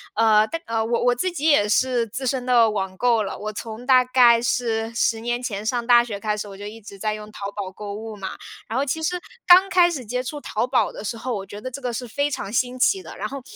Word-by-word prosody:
呃， 215 -1 +4
但 330 +5 -5
呃， 225 -1 -1
我 235 +1 0
我 245 0 +4
自 245 +10 -1
己 330 -4 -5
也 210 -9 +4
是 245 +2 +2
资 260 +5 -5
深 255 -1 -1
的 240 -3 +5
网 195 -3 -3
购 235 -1 +2
了， 195 - -5
我 215 0 -5
从 225 +2 -7
大 255 -1 +6
概 245 -2 +5
是 230 -1 -1
10 230 -1 +1
年 240 +1 -2
前 210 -4 -4
上 240 +1 -1
大 240 -1 +7
学 215 -4 -6
开 210 0 -1
始， 210 - -5
我 195 -1 -10
就 205 - -8
一 215 +2 -8
直 200 -1 -12
在 215 +1 -1
用 215 0 -8
淘 200 -1 -6
宝 200 -2 -5
购 200 +1 -7
物 220 +1 -7
嘛。 195 -2 -5 0.4
然 225 - -3
后 275 - +1
其 305 +4 -2
实 355 +3 -1 0.3
刚 370 +2 +8
开 360 -2 +5
始 280 -8 -5
接 250 +4 -2
触 290 +4 -6
淘 235 -1 -2
宝 255 -1 +1
的 - - -9
时 230 +2 -4
候， 250 +2 -4
我 195 -1 -5
觉 205 - -9
得 255 +4 -6
这 275 +2 -7
个 250 - -2
是 245 +2 -4
非 285 +5 -1
常 205 -8 -5
新 250 +2 0
奇 195 -6 +2
的， 165 - -11
然 210 - -3
后 275 +3 -7
230 Hz, 290 characters per minute, -23 LUFS, 210-255 Hz, 0.4 s, 刚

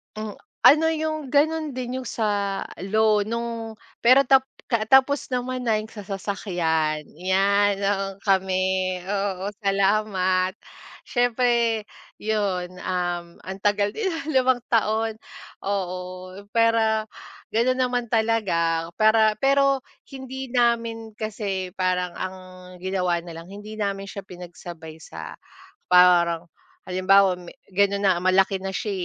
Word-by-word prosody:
Mm, 215 -1 -6 0.3
ano 315 +3 +7
yung 315 0 -1 0.2
ganun 310 0 +2
din 255 0 -4
sa 205 -4 -1 0.3
loan 215 0 +3
nung 230 -1 -4 0.3
pero 255 +3 +6
tap 265 0 +4 0.3
kaa 220 -2 +1
tapos 265 +2 +4
naman 255 +1 -2
na 225 -2 +3
yung 215 +1 -4
sa 205 -3 -9
sasakyan. 175 -6 -1 0.2
Yan, 200 +2 +2
noong 195 -1 -1
kami 185 -1 +1
oo, 195 0 -2
salamat. 195 -2 +1 0.5
Siyempre 235 -2 +1 0.3
yun, 190 -4 -2
um, 175 -2 -3
antagal 205 +2 0
din 435 -3 -2 0.2
5 260 -3 +2
taon, 220 0 +1 0.5
oo, 190 -2 -2 0.6
pwera 225 -1 +3 0.5
ganun 240 +3 +2
naman 250 -1 0
talaga 190 -8 +1
para 220 0 +4
pero 275 -1 +3 0.3
hindi 265 0 -6
namin 230 -2 0
kasi 200 -4 -3
parang 180 -1 0
ang 185 0 -5 0.4
ginawa 180 -2 0
nalang 170 +1 -10
hindi 205 +2 -9
namin 200 -2 -3
siya 195 0 -7
pinagsabay 175 -3 -10
sa 80 - -9 0.6
parang, 175 -2 +5 0.4
halimbawa 185 +1 +4
ma 175 -1 -11 0.2
ganon 200 +1 +2
na 185 - +4
malaki 190 +1 +3
na 195 - -3
siya, 210 - -2
205 Hz, 115 wpm, -24 LUFS, 185-230 Hz, 0.6 s, ano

